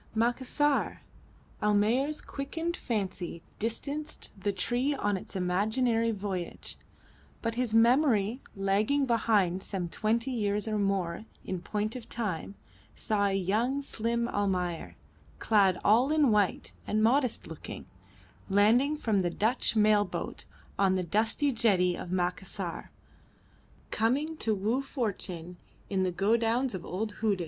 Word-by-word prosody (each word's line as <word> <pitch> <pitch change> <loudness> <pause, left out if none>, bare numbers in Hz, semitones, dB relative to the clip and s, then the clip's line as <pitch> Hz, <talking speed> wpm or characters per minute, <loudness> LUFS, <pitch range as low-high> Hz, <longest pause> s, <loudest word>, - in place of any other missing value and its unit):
Macassar! 260 +5 +1 0.6
Almayer's 220 +8 +2
quickened 325 +5 -4
fancy 185 -7 -3 0.2
distanced 285 +7 -3
the 205 - +1
tree 245 +9 0
on 205 -6 0
its 190 - -7
imaginary 220 +6 +1
voyage, 195 -5 -4 0.7
but 230 0 0
his 235 -2 -1
memory 235 -1 +4
lagging 205 +8 +2
behind 210 -6 +2
some 190 -3 -3
twenty 230 +8 0
years 210 -3 0
or 215 -1 0
more 195 -1 -1 0.2
in 185 -2 -3
point 210 +4 -2
of 250 - -8
time 200 -4 -3 0.4
saw 210 -3 0
a 200 - +1
young 210 +7 +1
and 280 0 -3
slim 235 0 -1
Almayer, 180 -5 -1 0.4
clad 195 -5 +3
all 240 +7 +5
in 300 -5 +4
white 205 -3 +1 0.2
and 215 +1 +1
modest 250 +1 +2
looking, - - -8 0.6
landing 230 +9 +4
from 220 -8 +1
the 180 -2 +1
Dutch 220 +7 0
mail 210 -1 +5
boat 185 - -5 0.3
on 190 -1 +4
the 185 - 0
dusty 220 - +1
jetty 190 -7 +3
of 175 - -7
Macassar, 180 0 -2 1.0
coming 280 +8 +1
to 220 -5 0
woo 220 +7 0
fortune 185 - -4 0.3
in 190 -1 +1
the 185 -1 +1
godowns 230 +6 +1
of 185 -3 -5
old 210 +3 -4
Hudig. 210 -4 +2
215 Hz, 130 wpm, -29 LUFS, 195-240 Hz, 1.0 s, all